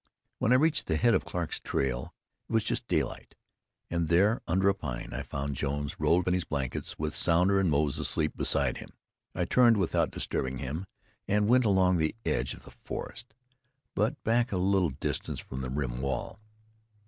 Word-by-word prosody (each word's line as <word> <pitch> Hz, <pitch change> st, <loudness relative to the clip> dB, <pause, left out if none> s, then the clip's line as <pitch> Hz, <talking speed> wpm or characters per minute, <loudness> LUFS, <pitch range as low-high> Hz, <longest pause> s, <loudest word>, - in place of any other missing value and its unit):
When 115 Hz, -, +2 dB
I -, -, +7 dB
reached 155 Hz, +4 st, +3 dB
the 80 Hz, -, +1 dB
head 120 Hz, +4 st, +4 dB
of -, -, +1 dB
Clarke's 85 Hz, -3 st, -3 dB
trail 65 Hz, -2 st, -2 dB, 0.4 s
it -, -, -6 dB
was 110 Hz, -1 st, +3 dB
just -, -, -2 dB
daylight; -, -, -2 dB, 0.6 s
and 85 Hz, -1 st, 0 dB
there, 100 Hz, +8 st, +3 dB
under 95 Hz, +3 st, +2 dB
a 100 Hz, -, +5 dB
pine, 65 Hz, -10 st, -6 dB
I -, -, -3 dB
found 70 Hz, 0 st, -4 dB
Jones 70 Hz, +1 st, -3 dB
rolled 90 Hz, +2 st, +2 dB
in 90 Hz, -, +3 dB
his 90 Hz, -1 st, +1 dB
blankets, 70 Hz, -4 st, -4 dB
with 75 Hz, 0 st, -3 dB
Sounder 90 Hz, +4 st, +3 dB
and 95 Hz, -3 st, +2 dB
Moze 75 Hz, -1 st, +1 dB
asleep 75 Hz, -1 st, 0 dB
beside -, -, +1 dB
him. -, -, -11 dB, 0.4 s
I 90 Hz, -, 0 dB
turned 120 Hz, +3 st, +5 dB
without 95 Hz, -4 st, +1 dB
disturbing 65 Hz, 0 st, -3 dB
him, 70 Hz, +9 st, -4 dB, 0.4 s
and 105 Hz, +1 st, +2 dB
went 125 Hz, +1 st, +4 dB
along 95 Hz, -3 st, +4 dB
the 80 Hz, +3 st, 0 dB
edge -, -, 0 dB
of -, -, -16 dB
the -, -, -13 dB
forest, 120 Hz, -2 st, -8 dB, 0.6 s
but 105 Hz, +2 st, -1 dB
back 120 Hz, +2 st, +2 dB
a 95 Hz, -, 0 dB
little 95 Hz, -1 st, +2 dB
distance 65 Hz, -, -3 dB
from 65 Hz, -, -6 dB
the 65 Hz, -, -4 dB
rim 65 Hz, -2 st, -2 dB
wall. 70 Hz, +9 st, -3 dB
85 Hz, 185 wpm, -29 LUFS, 70-100 Hz, 0.6 s, I